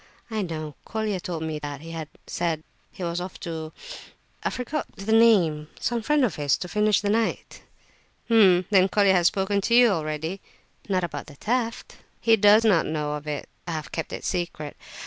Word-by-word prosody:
"I 220 -1 -1
know, 155 -5 -4
Colia 215 -3 -2
told 175 -3 -4
me 155 -1 -3
that 145 -1 -6
he 165 +1 -9
had 160 -2 -5 0.2
said 165 -3 -2 0.3
he 185 - -8
was 170 0 -2
off 180 +1 -7
to—I 160 -1 -7
forget 265 +4 -3
the 195 +3 -4
name, 190 -10 +4
some 235 0 -1
friend 290 +4 +3
of 205 - -3
his, 145 -2 +2
to 180 - -5
finish 210 +2 +2
the 205 - -1
night." 225 +1 -1 0.6
"H'm! 190 -6 +5
then 190 -1 +5
Colia 200 -1 +4
has 175 -2 +4
spoken 200 +2 0
to 235 +4 +2
you 245 -1 +7
already?" 160 +1 -2 0.5
"Not 185 -2 +1
about 145 -4 -5
the 145 - -12
theft." 230 - -2 0.2
"He 225 -1 +5
does 210 +1 +6
not 190 -7 +4
know 150 -1 -2
of 150 0 -6
it; 150 -1 -4 0.2
I 170 - -2
have 155 -2 -5
kept 165 - -4
it - - -6
a - - -7
secret. 170 -5 -3
185 Hz, 190 wpm, -25 LUFS, 160-215 Hz, 0.6 s, you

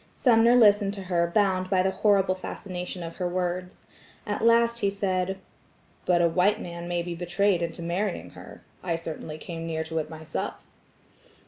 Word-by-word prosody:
Sumner 235 -1 +5
listened 205 -3 +5
to 195 - -6
her 175 -2 +1
bound 185 0 +1
by 185 -1 +3
the 190 - +1
horrible 195 -2 +3
fascination 180 -1 -6
of 165 0 -8
her 180 - -1
words. 180 0 -3 0.4
At 210 0 -3
last 235 0 +4
he 200 - +2
said: 190 -1 -1 0.7
"But 175 -1 +4
a - - +5
white 185 +6 +2
man 170 -2 -7
may 175 -1 -1
be 175 0 -4
betrayed 175 +2 +1
into 170 0 -4
marrying 180 +3 -2
her. - - -12 0.2
I 175 -2 -1
certainly 160 -1 -6
came 165 0 -6
near 160 -1 -2
to 160 0 -3
it 155 - -4
myself." 160 -1 -5
185 Hz, 175 wpm, -26 LUFS, 170-200 Hz, 0.7 s, Sumner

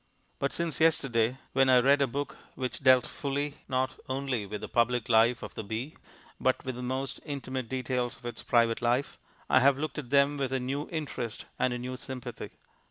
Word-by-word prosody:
But - - 0
since 170 -3 -2
yesterday, 130 -7 +3 0.2
when 135 0 +4
I 130 - +7
read 140 +3 +5
a 140 - +4
book 140 +4 -3 0.2
which 130 -1 -3
dealt 130 -2 +6
fully, 145 +1 -3
not 130 0 0
only 130 -5 -1
with 105 +1 -5
the - - -5
public 120 0 +1
life 115 +1 +4
of - - -7
the - - -5
bee, 115 +8 -4 0.4
but - - +1
with 130 - -2
the 125 - -7
most 130 +2 -3
intimate 130 -4 -4
details 125 -1 -1
of - - -17
its 120 - -5
private 115 -1 +2
life, 120 +4 0 0.3
I - - +5
have 135 +1 +5
looked 155 +1 -3
at 130 -5 -7
them 140 +1 +4
with 135 -2 -1
a 130 - +1
new 135 +4 -3
interest 145 -8 -4
and 130 - +2
a 125 - -2
new 125 +1 -5
sympathy. 125 0 -6
130 Hz, 200 wpm, -29 LUFS, 120-140 Hz, 0.4 s, I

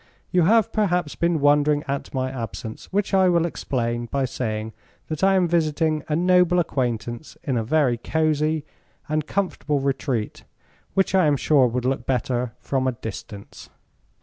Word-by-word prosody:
You 180 -3 +3
have 225 +3 +4
perhaps 180 -7 +1
been 170 -1 +1
wondering 145 +1 +3
at 140 0 -3
my 130 -1 -2
absence, 115 -3 -7
which 200 +1 -1
I 190 -1 +5
will 170 -1 +3
explain 120 -7 -2
by 135 +2 -1
saying 110 -3 -3 0.4
that 155 +3 -4
I 195 0 +5
am 185 -2 +3
visiting 160 -2 +1
a 150 - 0
noble 180 +1 +4
acquaintance 120 -5 -2
in 135 - -1
a 115 - 0
very 130 -1 +2
cozy 155 +1 0 0.4
and 155 0 -1
comfortable 175 -7 -1
retreat 135 -4 -2 0.5
which 195 -1 +2
I 185 -4 +4
am 145 -1 +3
sure 135 -2 +4
would 125 +1 -2
look 135 +1 -1
better 125 -2 -1
from 130 -1 -1
a 130 - +1
distance. 105 -3 -9
145 Hz, 160 wpm, -23 LUFS, 125-170 Hz, 0.5 s, I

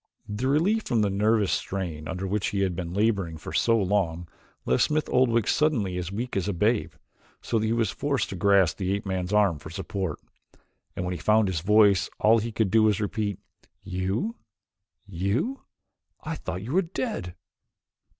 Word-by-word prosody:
The 105 +5 -2
relief 180 +11 +2
from 115 -3 +2
the 100 - +1
nervous 105 +1 +2
strain 85 -6 -3
under 95 +2 -4
which 100 +1 -1
he 100 -2 -1
had 95 -3 0
been 85 -1 -4
laboring 100 -5 0
for 80 - -8
so 115 -1 +3
long, 90 -4 0 0.4
left 65 - +3
Smith 155 0 0
Oldwick 120 -4 +2
suddenly 120 -12 +1
as 90 0 -4
weak 120 +5 -4
as 95 0 0
a 100 - 0
babe, 105 +6 +1 0.5
so 115 - -1
that 110 - 0
he - - 0
was 115 -4 +1
forced 140 +1 -1
to - - -5
grasp 95 -2 +3
the 95 -1 -1
ape 100 - -5
man's 95 -1 -2
arm 100 -7 +3
for 80 - -10
support 95 -1 -4 0.8
and 90 - -3
when 90 - -2
he 90 - -5
found 110 -1 +3
his 85 -4 -2
voice 100 0 +4
all 115 +2 +5
he 115 +2 -3
could 110 -3 0
do 110 - +5
was 105 -2 +3
to - - -2
repeat: 105 -1 -2 0.5
"You? 95 - -2 0.7
You? 100 - -2 0.6
I 155 - -3
thought 95 - -5
you 125 +6 -5
were 190 - +4
dead!" 170 - -4
100 Hz, 190 wpm, -26 LUFS, 95-115 Hz, 0.8 s, all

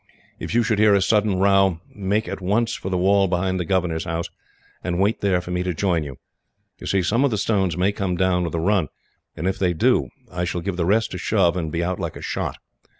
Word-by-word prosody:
"If - - -4
you 120 - +4
should 110 -2 0
hear 105 -1 +5
a - - +4
sudden 105 -2 +2
row, 95 -2 +3
make 105 +2 -1
at - - -5
once 110 +5 +1
for 95 - -5
the 90 - 0
wall 100 +2 +3
behind 95 +1 0
the 90 - -2
governor's 85 -2 0
house, 85 +1 -3 0.5
and 90 0 -2
wait 100 +3 +1
there 95 -3 +2
for 90 - -8
me 90 0 -1
to 90 -1 -2
join 85 -3 +1
you. 70 -3 -8 0.6
You - - -8
see, 95 -2 +1
some 115 +9 +2
of 140 - +3
the 110 - -1
stones 95 -5 0
may 95 +3 +2
come 95 -3 -2
down 90 -1 +2
with 85 -1 -3
a - - 0
run, 95 -1 +2 0.5
and 85 - -2
if 95 - -1
they 90 -2 +2
do 80 - +2 0.2
I 90 +1 -3
shall 90 0 -2
give 95 +1 -3
the 85 -1 -1
rest 110 +3 +2
a - - -4
shove, 85 0 +2
and 80 -4 -3
be 85 +1 -1
out 90 +1 -2
like - - -4
a - - -9
shot. - - -3
95 Hz, 250 wpm, -22 LUFS, 90-100 Hz, 0.6 s, hear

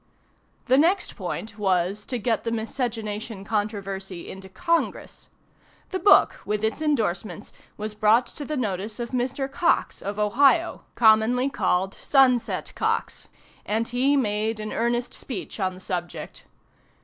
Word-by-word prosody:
The 260 +1 +4
next 355 +6 +2
point 220 0 -5
was, 190 +1 0
to 250 - -2
get 225 -1 0
the 230 - -1
miscegenation 220 -3 -3
controversy 195 -4 -3
into 190 0 -10
Congress. 335 - -2 0.6
The 375 - -2
book, 405 - +5
with 210 0 -2
its 220 +7 -1
indorsements, 215 - -1 0.2
was 215 0 -4
brought 215 +3 +4
to 290 - -8
the 305 +1 -3
notice 210 -2 -3
of 235 -1 -4
Mr. 260 +2 -1
Cox, 335 +5 +1
of 200 +1 -4
Ohio 275 +11 +3
(commonly 235 +4 +4
called 190 -3 0
"Sunset 260 -4 +3
Cox;") - - -2 0.4
and 225 +2 -1
he 265 +4 +2
made 215 -2 0
an 215 0 -5
earnest 240 +1 -1
speech 230 -3 -6
on 185 -2 -1
the - - -12
subject. 175 -2 -5
220 Hz, 135 wpm, -25 LUFS, 205-255 Hz, 0.6 s, book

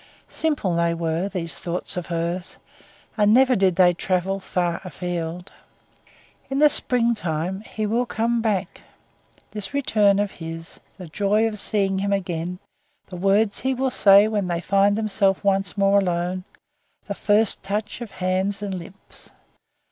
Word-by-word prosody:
Simple 290 - -1
they 170 0 +1
were, 165 +3 -2
these 170 -6 -4
thoughts 175 +1 -3
of 180 -1 -4
hers, 170 +1 -3 0.6
and 210 -1 +4
never 255 +2 +5
did 190 -3 +2
they 180 -1 +5
travel 185 +2 -1
far 175 -2 -2
afield. 175 -1 -5 1.0
In 270 - -2
the 300 +1 +6
springtime 195 - 0
he 215 0 -4
will 235 +4 0
come 230 +1 0
back; 210 -4 -2 0.7
this 210 +5 -5
return 210 -7 +3
of 205 -1 0
his, 165 0 -8 0.2
the 185 - -8
joy 205 +6 +1
of 210 -2 -5
seeing 195 -2 0
him 200 +1 -1
again, 180 -2 -3 0.5
the 185 - -10
words 200 +3 +2
he 265 +1 -1
will 260 +1 0
say 200 -1 +6
when 210 -3 -1
they 170 -1 -1
find 200 +3 +2
themselves 200 -3 +1
once 195 -1 +1
more 200 0 +4
alone, 180 0 -2 0.6
the 200 - -4
first 205 +1 +2
touch 210 +4 -4
of 235 - -6
hands 190 +2 -1
and 200 -2 -3
lips. 185 +2 -10
195 Hz, 150 wpm, -23 LUFS, 180-210 Hz, 1.0 s, the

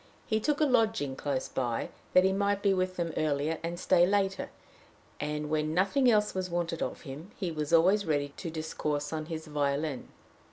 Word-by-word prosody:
He 220 - +1
took 295 +6 0
a 310 - +4
lodging 225 - +2
close 140 -1 -2
by, 120 -3 -2 0.2
that 185 - +7
he 190 0 +3
might 200 0 0
be 200 -1 +4
with 185 0 0
them 170 -2 -2
earlier, 155 +1 0
and 170 +1 -4
stay 185 -1 +4
later; 195 -1 0 0.7
and, 150 0 -2
when 155 0 0
nothing 220 +8 +3
else 210 -2 +3
was 185 -1 -2
wanted 170 -1 -2
of - - -3
him, 150 +5 -8
he 180 -4 -2
was 150 -2 -3
always 185 +5 +5
ready 145 -4 0
to 170 - -5
discourse 150 -2 -3
on 155 -1 -3
his 160 -1 -5
violin. 145 -1 -1
165 Hz, 190 wpm, -30 LUFS, 150-195 Hz, 0.7 s, that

